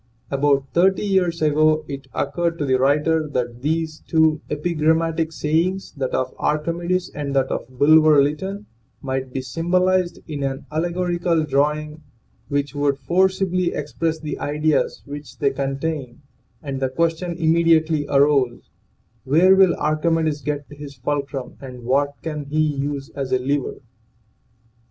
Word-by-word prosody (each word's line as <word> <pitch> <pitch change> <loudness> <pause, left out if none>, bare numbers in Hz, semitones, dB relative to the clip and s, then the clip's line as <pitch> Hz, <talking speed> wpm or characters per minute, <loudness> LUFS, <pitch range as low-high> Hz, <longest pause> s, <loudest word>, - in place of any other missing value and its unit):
About 140 0 +2
thirty 190 +4 +3
years 180 -5 +1
ago 155 +1 +3
it 140 -1 -7
occurred 170 +4 -1
to 150 - -2
the 130 -1 +2
writer 150 +4 +2
that 120 -3 -3
these 160 +2 -1
two 160 -1 +3
epigrammatic 160 +1 0
sayings 165 +5 -1
that 135 -3 -3
of 130 0 -1
Archimedes 170 +4 -1
and 140 -2 -4
that 135 -1 +1
of - - -3
Bulwer 155 +3 +5
Lytton 190 +9 -1 0.4
might 130 -1 -3
be 130 0 -4
symbolized 180 +5 +1
in 150 -3 -5
an 135 0 -3
alle 160 +3 0
gorical 175 -2 0
drawing 150 +2 0 0.5
which 145 -1 -1
would 145 -1 0
forcibly 185 +2 +1
express 160 +2 -2
the 150 -2 -5
ideas 150 +1 0
which 145 -3 -9
they 140 -1 +1
contain, 135 -1 -4 0.4
and 135 -2 -4
the 130 -1 0
question 165 +4 -1
immediately 160 -2 +3
arose 140 -3 +2 0.5
Where 170 +8 +5
will 190 -2 +5
Archimedes 155 0 0
get 145 +1 -3
his 145 -1 -9
fulcrum 140 0 -4
and 125 -3 -9
what 140 +3 +1
can 150 -3 -4
he 150 +2 -2
use 140 -2 -2
as 135 -2 -5
a 130 - +4
lever? 135 +2 -1
150 Hz, 140 wpm, -22 LUFS, 140-165 Hz, 0.5 s, Bulwer